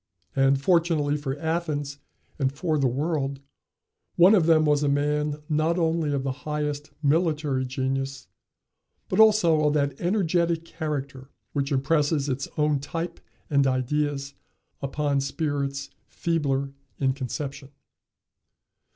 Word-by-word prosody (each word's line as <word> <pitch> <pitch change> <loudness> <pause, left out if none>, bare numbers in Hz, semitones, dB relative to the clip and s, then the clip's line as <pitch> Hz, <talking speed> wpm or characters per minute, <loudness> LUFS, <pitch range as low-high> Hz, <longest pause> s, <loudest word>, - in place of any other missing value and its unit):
And, 135 0 +3
fortunately 165 -2 +2
for 145 -2 -3
Athens 150 -3 -2 0.4
and 135 -2 +1
for 155 +2 -1
the 135 - +3
world, 140 +1 -1 0.8
one 180 +4 +7
of 180 -6 +4
them 160 -1 +5
was 150 -1 +3
a 145 - +2
man, 150 +1 0
not 155 +3 +1
only 165 -2 +1
of 140 -2 -1
the 135 - -1
highest 150 +1 -3
military 150 -3 +1
genius, 135 +1 -3 0.8
but - - 0
also 205 -8 +5
of 150 - +1
that 140 -2 0
energetic 170 -3 +1
character 140 -5 -5 0.2
which 140 0 -1
impresses 145 +1 +1
its 135 0 -2
own 150 -2 +2
type 165 +4 -5 0.3
and 140 -2 +3
ideas 140 +2 -1 0.5
upon 140 0 0
spirits 140 -1 -2 0.2
feebler 140 -5 -1 0.3
in 135 -1 +1
conception. 135 +1 -5
145 Hz, 125 wpm, -26 LUFS, 140-160 Hz, 0.8 s, one